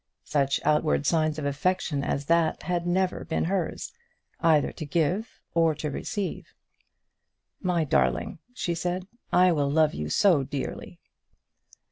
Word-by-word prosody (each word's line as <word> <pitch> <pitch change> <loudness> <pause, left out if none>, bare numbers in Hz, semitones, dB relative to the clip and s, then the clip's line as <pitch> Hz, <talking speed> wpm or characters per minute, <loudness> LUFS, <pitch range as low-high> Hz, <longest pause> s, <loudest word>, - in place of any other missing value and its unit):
Such 140 -2 +1
outward 150 -1 +2
signs 155 0 +2
of 150 - -3
affection 145 0 0
as 140 0 -2
that 165 0 +2
had 175 +1 -1
never 185 +1 0
been 160 - -1
hers, 185 - -2 0.5
either 160 -3 +3
to - - -7
give 170 +8 -1
or 165 -2 +3
to 150 0 -4
receive. 200 - -4 1.1
"My 180 -3 +1
darling," 65 - +1
she 180 -8 -2
said, 180 +2 -2 0.3
"I 180 0 +5
will 145 -4 +1
love 155 +1 +3
you 75 0 -4
so 175 - +4
dearly." 135 +1 -5
160 Hz, 135 wpm, -27 LUFS, 145-180 Hz, 1.1 s, I